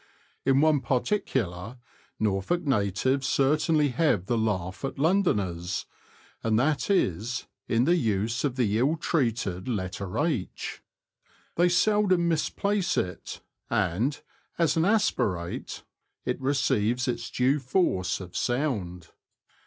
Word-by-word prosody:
In 135 +1 +4
one 155 -3 +4
particular 120 - -1 0.4
Norfolk 105 - 0
natives 130 - +1
certainly 150 +2 +2
have 125 - +1
the 120 - 0
laugh 100 -4 -2
at 135 - -3
Londoners, 100 - 0 0.6
and 110 -1 +1
that 145 - +1
is, 120 - 0 0.2
in 115 +1 +2
the 170 +6 +4
use 110 - 0
of 140 -4 0
the 110 -4 +1
ill 145 +7 +2
treated 115 - -1
letter 100 -2 -3
h. 145 - -2 0.7
They 175 +1 +4
seldom 185 -1 +3
misplace 185 +4 0
it, 90 0 -3 0.3
and, 105 - 0 0.4
as 165 -3 +2
an 165 0 +2
aspirate, 145 - 0 0.4
it - - -2
receives 125 -3 +1
its 120 -1 -2
due 130 +4 +2
force 130 - 0
of 90 -2 -10
sound. 105 - -2
125 Hz, 115 wpm, -27 LUFS, 100-155 Hz, 0.7 s, In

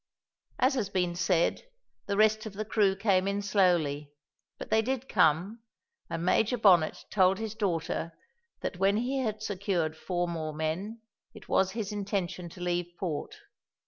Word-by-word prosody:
As 255 +2 +3
has 225 -7 -1
been 180 -3 0
said, 175 -1 +1 0.5
the 200 -1 -1
rest 215 +1 +3
of 210 - -8
the 215 +2 -4
crew 205 -3 +2
came 195 -2 +2
in 200 +1 -1
slowly, 170 -8 +1 0.5
but - - -9
they 220 - +4
did 260 +2 -2
come, 180 - +2 0.5
and 165 +1 -3
Major 225 +6 +2
Bonnet 180 -8 +4
told 190 -1 +4
his 220 -1 -4
daughter 170 -5 -2 0.5
that - - -4
when 195 +2 +3
he 255 +4 -1
had 215 -4 -2
secured 185 -6 -1
four 175 +2 -2
more 160 -3 -4
men, 180 +9 -3 0.3
it - - -13
was 190 0 +2
his 215 -2 -3
intention 190 -4 -3
to 180 - -13
leave 175 0 -1
port. 165 -6 -3
195 Hz, 160 wpm, -29 LUFS, 175-215 Hz, 0.5 s, they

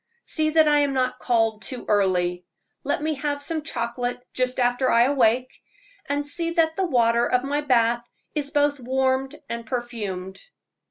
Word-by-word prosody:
"See 310 -1 0
that 315 0 +4
I 295 0 +4
am 285 -1 +1
not 255 -1 0
called 225 -3 +1
too 255 -2 -6
early; 180 -3 +1 0.4
let 285 +1 -1
me 310 0 0
have 285 0 -2
some 320 0 -3
chocolate 245 -3 -3
just 255 0 -1
after 245 +1 +2
I 230 0 +5
awake, 250 -2 +2 0.5
and 285 0 0
see 335 +3 -3
that 320 -2 +2
the 380 0 0
water 235 -4 +3
of 250 0 +2
my 285 +2 -1
bath 240 -3 +2 0.2
is 290 -2 -2
both 290 -1 +1
warmed 265 +2 0
and 235 0 -4
perfumed." 215 -6 -5
255 Hz, 165 wpm, -24 LUFS, 235-290 Hz, 0.5 s, I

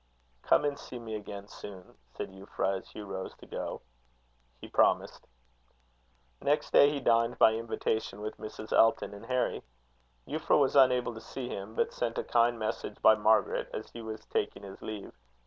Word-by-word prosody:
"Come - - +3
and 145 -1 -1
see 125 - -8
me 115 -2 -7
again 100 -1 -6
soon," 95 -4 -11 0.2
said - - -5
Euphra, 95 0 -2
as - - -17
Hugh 105 - -8
rose 95 -1 -6
to - - -15
go. - - -5 0.8
He - - -9
promised. - - +2 1.1
Next 145 +2 +1
day 140 - +8
he 145 -1 -2
dined 115 -1 +2
by 110 - +6
invitation 110 -2 -2
with 105 +1 -5
Mrs. 110 0 -7
Elton 115 -2 +4
and 100 - -10
Harry. 125 -1 0 0.7
Euphra 155 +1 +2
was 140 -1 +2
unable 125 -3 +5
to 110 - -9
see 125 -2 -6
him, 100 +1 -6
but - - 0
sent 115 -1 -2
a - - 0
kind 120 0 +3
message 110 -1 -4
by 110 - +9
Margaret 110 0 +2
as - - -6
he 115 - -8
was 110 -1 -7
taking 100 - -2
his 95 -1 -10
leave. 105 -2 -6
110 Hz, 175 wpm, -30 LUFS, 105-125 Hz, 1.1 s, by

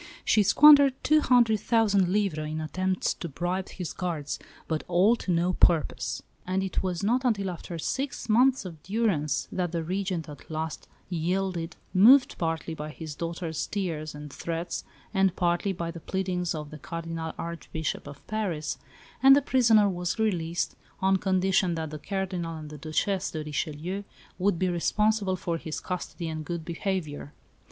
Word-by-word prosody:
She 215 - +4
squandered 280 +5 +7
two 310 0 +5
hundred 235 -5 +4
thousand 205 -4 +3
livres 180 -7 0
in 155 +1 -3
attempts 185 +4 -1
to 170 - -6
bribe 175 +5 -2
his 180 -3 -5
guards, 165 -6 -3 0.3
but 160 -1 -1
all 185 +6 +4
to 185 - -3
no 175 +2 +2
purpose: 155 -8 +2 0.2
and 190 +1 0
it 190 - -1
was 185 -1 -2
not 245 +5 +2
until 200 -6 +1
after 170 0 -7
six 270 - -3
months 250 +1 +4
of 165 -4 -8
durance 190 -9 0
that 180 -2 -1
the 170 -2 -2
Regent 185 -1 -2
at 145 -2 -11
last 160 0 -4 0.2
yielded 175 0 -1 0.2
moved 245 +8 +6
partly 165 -1 -2
by 150 -1 -6
his 155 0 -7
daughter's 165 0 -3
tears 160 -7 -3
and 150 -1 -9
threats 170 +1 -4 0.3
and 195 -2 +3
partly 175 +3 +1
by 170 -2 -3
the 170 - -8
pleadings 180 0 -2
of 150 -1 -6
the 155 - -9
Cardinal 165 0 -5
Archbishop 165 -3 -4
of 140 0 -11
Paris 190 -8 -2 0.4
and 270 0 +9
the - - +6
prisoner 230 -6 +5
was 180 -2 -2
released, 175 -6 0 0.2
on 190 0 +3
condition 185 -1 +2
that 160 -2 -4
the 155 - -6
Cardinal 185 -3 -3
and 155 -1 -8
the 150 - -8
Duchesse 185 +5 -1
de 155 -1 -4
Richelieu 155 +6 -3 0.4
would 190 -1 +2
be 185 - +1
responsible 200 +3 +1
for 170 -2 -3
his 160 -1 -5
custody 180 -2 -5
and 155 -1 -4
good 165 +1 -5
behaviour. 165 -5 -3
175 Hz, 165 wpm, -27 LUFS, 160-195 Hz, 0.4 s, and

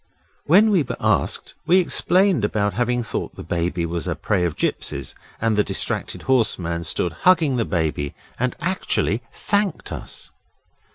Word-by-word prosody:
When 205 +7 +6
we 190 -5 +4
were 135 - -3
asked - - +1
we 180 - +6
explained 185 - +3
about 105 -1 0
having 120 0 0
thought 115 - -4
the - - -8
Baby 85 0 -1
was 85 0 -3
the - - -1
prey 90 - 0
of 80 -3 -2
gipsies, 70 -2 -2 0.3
and 115 -1 +1
the 105 - +3
distracted - - -3
horseman 90 -10 0
stood 85 +1 0 0.2
hugging 160 -8 +4
the 115 - +1
Baby, 80 -5 -1 0.2
and 125 0 0
actually 120 - 0
thanked 205 -4 -1
us. - - -7
115 Hz, 155 wpm, -22 LUFS, -, 0.3 s, When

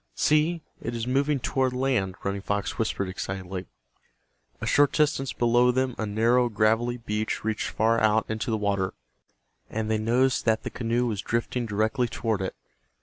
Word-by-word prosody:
"See, 155 +2 +2 0.2
it 120 +1 -4
is 115 -1 -2
moving 140 +3 +1
toward 130 0 0
land," 125 -8 0
Running 100 0 -2
Fox 100 +1 -2
whispered, 110 -3 -1
excitedly. 95 0 -5 0.9
A - - -4
short 145 -1 +4
distance 145 -4 +1
below 120 +1 +3
them 130 0 +1
a 110 - -1
narrow 120 +4 +3
gravelly 115 +3 +1
beach 110 -2 -3
reached 110 0 -1
far 115 +1 +2
out 110 0 +3
into 110 +1 -3
the 110 - +1
water, 100 -2 -1 0.7
and 110 0 -2
they 110 - +1
noticed 125 +4 +2
that 110 -1 +2
the - - -4
canoe 120 0 0
was 105 -4 -2
drifting 115 +2 -2
directly 110 +4 +1
toward 110 -3 -2
it. 95 - -3
115 Hz, 165 wpm, -26 LUFS, 105-125 Hz, 0.9 s, short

